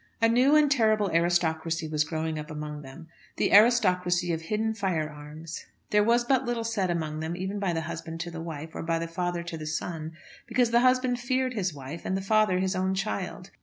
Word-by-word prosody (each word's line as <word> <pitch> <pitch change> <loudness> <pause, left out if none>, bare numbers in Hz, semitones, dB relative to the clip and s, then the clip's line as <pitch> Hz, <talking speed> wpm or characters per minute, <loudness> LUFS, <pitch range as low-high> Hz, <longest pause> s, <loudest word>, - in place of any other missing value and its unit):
A 230 - +4
new 250 +6 +4
and 300 -2 +5
terrible 215 -6 +3
aristocracy 165 -1 +1
was 155 -1 +1
growing 160 0 -3
up 150 +1 -7
among 150 -1 -6
them, 150 +4 -11 0.3
the - - +1
aristocracy 180 -6 +4
of 160 - -3
hidden 215 +6 -1
firearms. 155 -5 -4 0.3
There 210 0 +4
was 235 +2 +3
but 265 +1 +2
little 240 -2 -2
said 220 -5 -1
among 155 -3 -2
them, 160 +2 -3
even 190 +2 -3
by 195 -3 0
the 165 - -1
husband 160 0 -6
to 175 0 -5
the 165 -1 -6
wife, 160 -1 -6
or - - -5
by 165 0 0
the 165 0 -3
father 175 +1 -2
to 170 -1 -6
the 155 - -6
son; 160 +1 -4 0.3
because 245 -1 +2
the 235 - +5
husband 255 0 +3
feared 255 +1 0
his 190 -5 -1
wife, 145 +3 -8
and 190 - -1
the - - -3
father 215 -2 +3
his 190 +1 0
own 190 +1 0
child. 195 -1 -4
180 Hz, 210 wpm, -27 LUFS, 160-220 Hz, 0.3 s, and